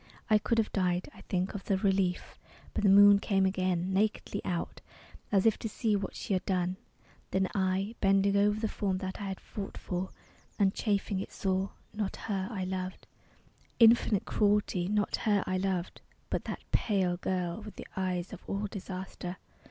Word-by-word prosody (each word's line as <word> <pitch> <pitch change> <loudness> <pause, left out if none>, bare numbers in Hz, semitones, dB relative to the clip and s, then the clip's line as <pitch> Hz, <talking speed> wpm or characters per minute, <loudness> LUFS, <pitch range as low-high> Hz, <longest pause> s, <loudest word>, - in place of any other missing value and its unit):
I 215 - +7
could 230 +2 0
have 220 -2 +1
died, 180 +4 0
I - - -14
think, 185 -2 0
of 200 - -6
the 195 - +2
relief. 190 -2 0 0.3
But - - -1
the 200 - +5
moon 200 +1 +8
came 195 -1 +2
again, 185 -1 0
nakedly 205 0 0
out, 175 -2 -3 0.5
As 195 -1 +3
if 225 - +4
to 225 - -3
see 215 0 0
what 200 - -3
she - - -3
had 185 0 +1
done. 185 -1 0 0.5
Then 190 0 +1
I, 190 +2 0
Bending 195 0 +4
over 205 +1 +3
the 220 - 0
form 195 -3 -1
that 190 +1 -5
I - - -3
had 190 -1 -4
fought 200 -2 -7
for, 180 +1 -3 0.5
And 195 -1 +3
chafing 200 -2 0
it, 195 - -5
saw... 190 0 0 0.2
not 210 -2 -2
her 195 -3 -3
I 195 -5 -3
loved! 185 0 -4 0.7
Infinite 230 -3 +5
Cruelty, 205 -4 +2
not 210 +1 +1
her 205 -3 +2
I 185 - 0
loved!... 185 -2 -2 0.3
But - - -1
that - - -5
pale 190 -5 +1
girl, 180 +1 -2
with 210 0 -9
the - - -8
eyes 185 -1 -2
of - - -8
all 200 +1 -2
disaster. 185 -2 -6
195 Hz, 180 wpm, -31 LUFS, 185-205 Hz, 0.7 s, moon